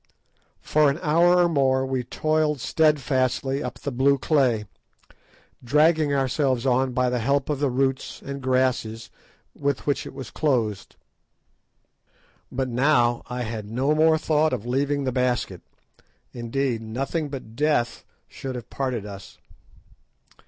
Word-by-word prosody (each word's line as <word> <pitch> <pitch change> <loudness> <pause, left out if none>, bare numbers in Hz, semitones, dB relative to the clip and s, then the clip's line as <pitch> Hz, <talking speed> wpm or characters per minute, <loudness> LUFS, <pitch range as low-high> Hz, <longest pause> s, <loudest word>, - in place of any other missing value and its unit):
For 150 -1 +3
an 140 - -1
hour 170 +3 +4
or 175 -1 +5
more 135 -4 +2
we 130 -1 -2
toiled 155 +3 0
steadfastly 135 -2 +1
up - - -5
the 140 - -5
blue 135 +3 +3
clay, 130 -7 +1 1.0
dragging 150 +3 +3
ourselves 135 -2 0
on 130 0 +2
by 125 0 +1
the 125 - 0
help 140 +5 0
of 145 - -2
the 145 -1 +1
roots 130 +1 -1
and 140 0 -7
grasses 130 -4 0 0.4
with 140 -2 -2
which 145 - -1
it - - -11
was 135 -4 -8
clothed. 115 -9 -1 1.6
But 130 0 -2
now 120 -1 +2
I 125 0 -4
had 110 -2 -5
no 130 +6 +1
more 160 +1 +4
thought 155 0 +1
of 105 - -3
leaving 140 +3 0
the 130 - -1
basket; 120 -7 -1 0.7
indeed, 120 0 -2
nothing 135 +7 -3
but 130 -5 -8
death 145 -4 0 0.2
should 130 -1 -7
have 120 -1 -8
parted 125 -6 -2
us. 100 -1 -10
135 Hz, 140 wpm, -24 LUFS, 125-145 Hz, 1.6 s, or